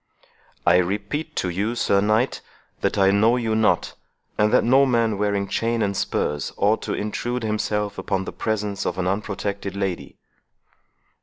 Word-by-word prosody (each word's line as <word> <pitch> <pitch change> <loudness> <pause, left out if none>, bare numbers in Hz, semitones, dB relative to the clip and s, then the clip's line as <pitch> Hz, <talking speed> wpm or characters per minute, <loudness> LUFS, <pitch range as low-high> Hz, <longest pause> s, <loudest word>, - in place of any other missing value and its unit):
"I 85 0 +6
repeat 105 - -2
to 90 - -1
you, 100 +7 -1
Sir 100 -4 +2
Knight, 110 +5 +1 0.4
that - - 0
I 95 -1 +5
know 110 +4 +4
you 115 -3 -1
not, 110 0 +2 0.4
and 105 0 +2
that - - +4
no 130 +3 +5
man 115 -5 +1
wearing 100 -1 0
chain 115 +2 0
and 100 -1 -1
spurs 75 -5 -1
ought 105 +3 +2
thus - - -7
to - - -4
intrude 120 +3 -3
himself 105 -1 -1
upon 95 -2 -2
the - - -6
presence 105 -2 -2
of 90 - -2
an 95 - -1
unprotected 100 0 -3
lady." 95 -3 -3
105 Hz, 165 wpm, -23 LUFS, 100-110 Hz, 0.4 s, I